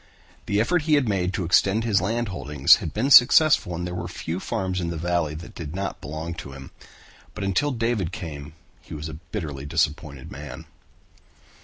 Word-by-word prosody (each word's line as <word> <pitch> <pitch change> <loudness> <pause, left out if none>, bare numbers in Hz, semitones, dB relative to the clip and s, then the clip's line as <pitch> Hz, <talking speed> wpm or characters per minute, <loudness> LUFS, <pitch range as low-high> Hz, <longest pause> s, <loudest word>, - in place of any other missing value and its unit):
The 100 - +1
effort 175 +10 +2
he 150 - +6
had 140 -4 +2
made 95 -3 0
to 100 - -2
extend 100 +5 +3
his 105 -3 +2
land 115 +3 -1
holdings 75 -5 +4
had 80 - -5
been 130 +7 -1
successful 130 - +6
and 90 +1 -4
there 90 - -5
were 90 -1 -4
few 85 0 -5
farms 95 -1 -2
in 85 - -2
the 85 - -4
valley 85 -2 -1
that 85 +2 -9
did 80 -1 -7
not 100 +1 -4
belong 80 +3 -5
to 70 - -10
him, 65 -1 -11 0.6
but 100 - -5
until 100 +10 +1
David 115 - -1
came 75 -5 -7 0.3
he - - -10
was 75 +1 -6
a - - -7 0.2
bitterly 75 -9 -5
disappointed 75 -3 -2
man. 70 -3 -9
90 Hz, 190 wpm, -24 LUFS, 75-105 Hz, 0.6 s, he